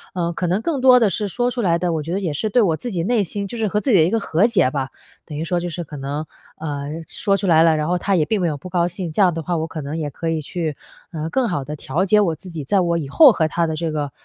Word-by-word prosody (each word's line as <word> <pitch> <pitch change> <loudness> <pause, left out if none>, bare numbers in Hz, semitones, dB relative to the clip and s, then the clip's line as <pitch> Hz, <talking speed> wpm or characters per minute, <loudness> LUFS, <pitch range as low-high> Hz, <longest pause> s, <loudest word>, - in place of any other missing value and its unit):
呃， 170 -1 -1
可 180 +1 -2
能 180 +4 +1
更 295 -6 -1
多 255 -1 +7
的 220 - +3
是 210 +3 -2
说 245 +6 -1
出 245 -1 -3
来 170 -4 +2
的， 175 -1 -1
我 160 - -1
觉 160 +3 -6
得 195 - 0
也 175 -6 -2
是 215 +9 -2
对 245 - +3
我 170 -5 +2
自 245 - -5
己 170 -3 -2
内 220 +1 +2
心 200 +3 -4
就 235 - -7
是 220 -2 0
和 210 +2 0
自 260 - 0
己 200 - +6
的 160 - +6
一 165 - +2
个 225 - +1
和 200 0 +2
解 185 - +2
吧。 135 -2 -2 0.4
等 150 -2 -7
于 160 - -2
说 175 +1 0
就 175 0 -4
是 175 +1 -5
可 150 -1 -10
能， 140 +3 -4 0.3
呃， 145 -3 -4 0.2
说 200 -1 0
出 195 - -3
来 160 -2 +5
了， 165 -1 +4
然 150 +1 -1
后 180 - +1
她 200 +2 +1
也 160 -4 +2
并 215 +4 0
没 175 - +1
有 150 -3 -2
不 165 +6 -10
高 175 -1 +1
兴， 175 -2 -5
这 180 - 0
样 185 -2 +5
的 165 - -4
话 175 +1 -1
我 160 0 -2
可 160 -1 -6
能 145 +3 -5
也 155 -2 -3
可 165 +3 -4
以 160 -1 -1
去， 160 0 -3 0.4
啊， 160 -1 -4
更 260 +3 +1
好 145 -6 -2
地 150 +3 -6
调 155 +6 -1
节 210 +2 +4
我 170 -6 +1
自 185 +4 -12
己， 160 -3 -5
在 195 +8 +2
我 170 -1 +1
以 140 - -5
后 290 - +8
和 160 -6 +1
她 170 +2 0
的 160 - -2
这 160 0 -2
个 145 -2 -3
170 Hz, 355 characters per minute, -21 LUFS, 155-200 Hz, 0.4 s, 后